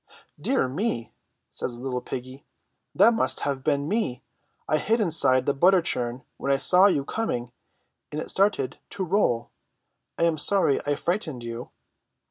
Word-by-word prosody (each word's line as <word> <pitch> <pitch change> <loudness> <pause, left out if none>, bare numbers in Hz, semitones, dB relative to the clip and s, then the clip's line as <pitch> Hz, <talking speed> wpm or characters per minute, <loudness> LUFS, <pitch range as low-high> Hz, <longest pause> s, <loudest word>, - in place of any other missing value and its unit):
"Dear 265 - +1
me!" 135 - -3 0.4
says 120 -2 -4
the 120 - -11
little 125 -2 -3
piggy, 130 +2 -8 0.5
"that 235 - +5
must 225 - 0
have 140 -2 -2
been 145 -1 0
me! 200 - -2 0.4
I 155 - +1
hid 225 +2 +1
inside 150 - +4
the 140 - +1
butter 180 +7 +4
churn 125 -6 -2
when 140 - -2
I 135 - +3
saw 180 +9 +6
you 145 -8 0
coming, 125 - -3 0.6
and 150 - -4
it - - -3
started 195 -9 0
to 195 - -3
roll! 160 - 0 0.7
I - - 0
am 165 -2 +1
sorry 190 -5 +3
I 145 - +1
frightened 160 - -3
you 115 +1 -7
145 Hz, 160 wpm, -25 LUFS, 130-190 Hz, 0.7 s, saw